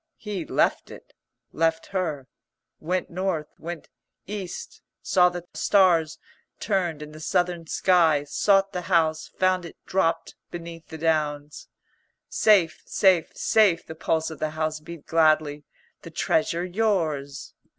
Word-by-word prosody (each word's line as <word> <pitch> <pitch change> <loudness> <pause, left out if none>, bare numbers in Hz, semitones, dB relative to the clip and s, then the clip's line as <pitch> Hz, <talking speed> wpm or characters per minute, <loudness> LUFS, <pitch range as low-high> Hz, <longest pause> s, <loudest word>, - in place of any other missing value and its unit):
He 200 -6 -5
left - - +1
it, - - -13 0.4
left 165 0 +1
her, 155 -8 -2 0.5
went 180 +3 -2
North, 175 -4 -2
went 170 -1 -7 0.4
East, 195 -3 -7 0.2
saw 180 -1 +4
the 175 -1 -7
stars 175 -6 +3 0.4
turned 175 -7 -1
in 150 - -10
the 155 - -11
Southern 175 +1 -1
sky; 165 -5 +3
sought 195 +6 +2
the 180 - -2
house, 160 -3 +2
found 185 -1 +2
it 170 - -10
dropped 165 -3 0 0.2
beneath 170 -1 -9
the 160 - -8
Downs. 150 -2 -1 0.6
"Safe, 190 -7 +3
safe, 185 -5 +2
safe," 200 -7 +3
the - - -8
pulse 160 0 -1
of 160 - -9
the 155 - -1
house 155 -1 -1
beat 160 0 -11
gladly. 155 -2 +2 0.4
"The - - -10
Treasure 170 +2 0
yours." 165 -9 -1
165 Hz, 130 wpm, -25 LUFS, 155-185 Hz, 0.6 s, saw